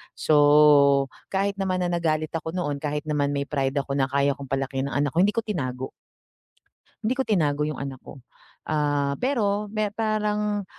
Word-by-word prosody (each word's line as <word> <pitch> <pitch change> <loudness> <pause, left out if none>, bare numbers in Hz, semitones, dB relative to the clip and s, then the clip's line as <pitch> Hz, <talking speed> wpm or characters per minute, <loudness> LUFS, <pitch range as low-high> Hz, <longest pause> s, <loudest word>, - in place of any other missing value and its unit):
So, 145 -2 +5 0.3
kahit 200 +1 0
naman 185 -1 0
na, 175 - 0
nagalit 155 -2 0
ako 160 0 -4
noon, 145 -6 -2
kahit 150 0 -2
naman 145 -1 0
may 140 0 -1
pride 135 -2 -1
ako, 140 0 -1
na 135 - +3
kaya 140 +1 +1
kong 140 -2 -9
palakihin 135 0 -1
ang 145 - 0
anak 145 - -2
ko, - - +3
hindi 205 +1 +2
ko 230 - +1
tinago. 130 - -3 1.2
Hindi 230 +4 +1
ko 265 - +1
tinago 150 -8 +1
yung 155 - -4
anak 135 -2 -6
ko. 135 - -12 0.5
Ah, 145 -2 0
pero 210 -6 0
me 215 -1 -1
parang, 210 -2 -1
150 Hz, 180 wpm, -25 LUFS, 140-200 Hz, 1.2 s, So